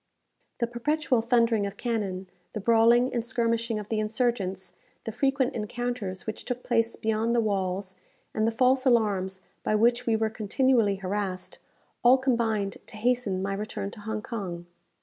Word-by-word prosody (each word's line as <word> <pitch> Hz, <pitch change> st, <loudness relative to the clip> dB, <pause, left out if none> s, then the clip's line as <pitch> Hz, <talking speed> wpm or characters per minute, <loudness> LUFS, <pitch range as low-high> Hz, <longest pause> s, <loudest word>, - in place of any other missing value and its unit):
The 235 Hz, -, +1 dB
perpetual 250 Hz, +2 st, 0 dB
thundering 230 Hz, -3 st, +2 dB
of 200 Hz, -, -8 dB
cannon, 200 Hz, -6 st, -2 dB, 0.3 s
the 215 Hz, -, -3 dB
brawling 235 Hz, +3 st, +4 dB
and 235 Hz, -2 st, 0 dB
skirmishing 230 Hz, -1 st, 0 dB
of 210 Hz, -1 st, -6 dB
the 220 Hz, -, 0 dB
insurgents, 215 Hz, -5 st, -1 dB, 0.3 s
the 225 Hz, -, -4 dB
frequent 270 Hz, +2 st, +1 dB
encounters 220 Hz, -3 st, -4 dB
which 220 Hz, -, -5 dB
took 250 Hz, 0 st, -4 dB
place 230 Hz, -1 st, +1 dB
beyond 220 Hz, +2 st, 0 dB
the -, -, +4 dB
walls, 190 Hz, -3 st, -1 dB, 0.4 s
and 215 Hz, 0 st, +1 dB
the -, -, +2 dB
false 255 Hz, +3 st, +3 dB
alarms 200 Hz, -7 st, +1 dB, 0.2 s
by 215 Hz, -, 0 dB
which 240 Hz, +3 st, +3 dB
we 225 Hz, -, +3 dB
were 220 Hz, 0 st, 0 dB
continually 220 Hz, 0 st, +2 dB
harassed, 190 Hz, -1 st, -3 dB, 0.4 s
all 250 Hz, +2 st, +7 dB
combined 230 Hz, -6 st, 0 dB
to -, -, -10 dB
hasten 220 Hz, -5 st, 0 dB
my 195 Hz, 0 st, -1 dB
return 200 Hz, 0 st, -4 dB
to 235 Hz, -, -12 dB
Hong 215 Hz, 0 st, -4 dB
Kong. 180 Hz, -7 st, -5 dB
225 Hz, 160 wpm, -27 LUFS, 200-240 Hz, 0.4 s, all